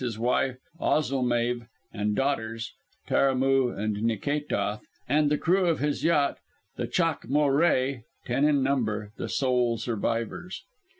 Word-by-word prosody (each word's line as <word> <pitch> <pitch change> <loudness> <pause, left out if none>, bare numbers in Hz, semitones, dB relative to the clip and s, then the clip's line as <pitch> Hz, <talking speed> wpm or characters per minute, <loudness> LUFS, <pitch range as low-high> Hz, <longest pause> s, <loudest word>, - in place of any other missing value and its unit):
_ - - -4
his 115 -4 -3
wife 125 +2 +1 0.2
Ozilmeave 120 -4 0 0.3
and 105 -1 -1
daughters, 115 -4 -2 0.3
Taramoo 135 -1 +3
and 105 -1 -2
Nikétoth, 115 -1 -1 0.3
and 150 +2 +3
the 150 - +2
crew 180 +3 +2
of 165 - +2
his 150 0 -1
yacht, 150 -4 +2 0.4
the - - -3
Chaac - - 0
molré 140 -2 +2 0.2
(ten 125 +3 0
in 145 -2 +3
number), 110 -6 -1
the - - -4
sole 125 -3 +1
survivors. 115 - -3
130 Hz, 130 wpm, -27 LUFS, 115-145 Hz, 0.4 s, Taramoo